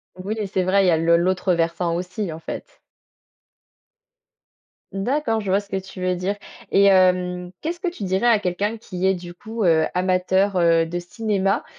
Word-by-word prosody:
Oui 185 +3 -4
et 210 - -2
c'est 190 -1 -1
vrai, 195 +2 +3
il - - +3
y - - +5
a 165 - +3
le 170 +1 +4
l'autre 185 +1 +1
versant 170 0 0
aussi 180 +2 -4
en 160 - -8
fait. - - -8 2.1
D'accord, 225 +3 0
je 200 -3 -3
vois 195 - +4
ce 200 -1 -13
que - - -3
tu 190 0 -10
veux 185 0 0
dire 185 +3 -2 0.4
et 200 - +5
hem, 180 -2 +3
qu'est-ce 340 +2 -3
que 365 - -3
tu 340 -11 -8
dirais 190 +4 0
à 235 -3 +5
quelqu'un 205 +4 -2
qui 190 -4 -5
est, 190 - +4
du 175 -1 -8
coup, 220 +4 -5
heu, 160 -3 +4
amateur, 185 +2 +1
heu, 165 -1 +3
de 175 - -4
cinéma, 195 +2 -1
185 Hz, 195 wpm, -22 LUFS, 180-200 Hz, 2.1 s, y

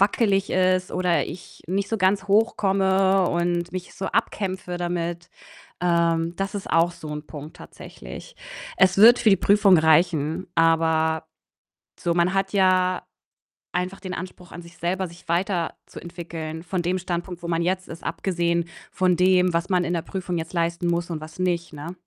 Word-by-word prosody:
wackelig 200 -1 +2
ist 185 0 +2
oder 180 -2 +1
ich 175 +2 -11
nicht 195 +2 -1
so 225 - -1
ganz 190 +1 +2
hoch 215 +3 +3
komme 190 -1 +2
und 175 0 -1
mich 185 -1 -6
so 190 - -4
abkämpfe 185 -3 -2
damit. 175 0 -3 0.5
Ähm, 170 -1 +1
das 195 +1 -3
ist 195 - -6
auch 165 +1 +3
so 155 - -11
'n 150 0 -6
Punkt 150 +1 -9
tatsächlich. - - -11 0.4
Es 190 0 +4
wird 235 +4 +8
für 220 - +4
die 195 - +6
Prüfung 200 -2 +5
reichen, 160 +1 +2
aber 160 -1 +2 0.7
so, 170 - 0
man 175 +2 +2
hat 195 0 0
ja 185 -2 +2 0.7
einfach 180 +2 -2
den 185 -2 -5
Anspruch 180 0 -9
an 175 - -8
sich 170 0 -16
selber, 180 +2 -1
sich 170 +2 -16
weiterzuentwickeln 170 -2 -4
von 180 +1 -3
dem 180 +2 0
Standpunkt, 175 0 -5
wo 170 - -5
man 165 -1 0
jetzt 185 +1 -1
ist, 165 - -10
abgesehen 170 -2 -1 0.3
von 185 -1 +2
dem, 180 0 +3
was 170 +1 -1
man 180 -2 +2
in 175 - -1
der 170 - -1
Prüfung 180 -1 -4
jetzt 160 0 -6
leisten 170 0 -1
muss 170 0 -1
und 160 -2 -4
was 160 +2 -11
nicht, 175 -2 -1
ne? 155 +4 -7
175 Hz, 170 wpm, -24 LUFS, 170-190 Hz, 0.7 s, wird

